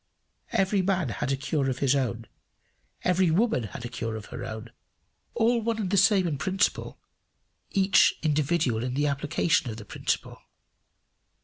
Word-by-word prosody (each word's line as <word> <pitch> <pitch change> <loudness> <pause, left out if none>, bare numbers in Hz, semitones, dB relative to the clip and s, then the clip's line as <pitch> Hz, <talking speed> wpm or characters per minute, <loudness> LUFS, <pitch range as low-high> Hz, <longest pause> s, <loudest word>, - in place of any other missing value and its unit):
Every 195 +1 +2
man 185 -6 0
had 135 +4 -2
a - - +2
cure 140 0 -1
of 130 - -2
his 140 0 +2
own; 120 -4 -2 0.8
every 180 0 +3
woman 175 - +1
had 120 +3 -8
a - - -2
cure 115 -1 -4
of 110 -2 -7
her - - -5
own 110 +1 -7 0.6
all 235 +1 +2
one 225 0 -1
and 200 -5 -2
the - - +2
same 195 -1 +4
in 145 -5 -3
principle, 190 +1 -1 0.7
each 195 0 +4
individual 150 -6 +1
in 125 0 -3
the 145 +2 +1
application 145 +1 +1
of 110 - -6
the 105 - -9
principle. - - -3
150 Hz, 165 wpm, -27 LUFS, 125-190 Hz, 0.8 s, same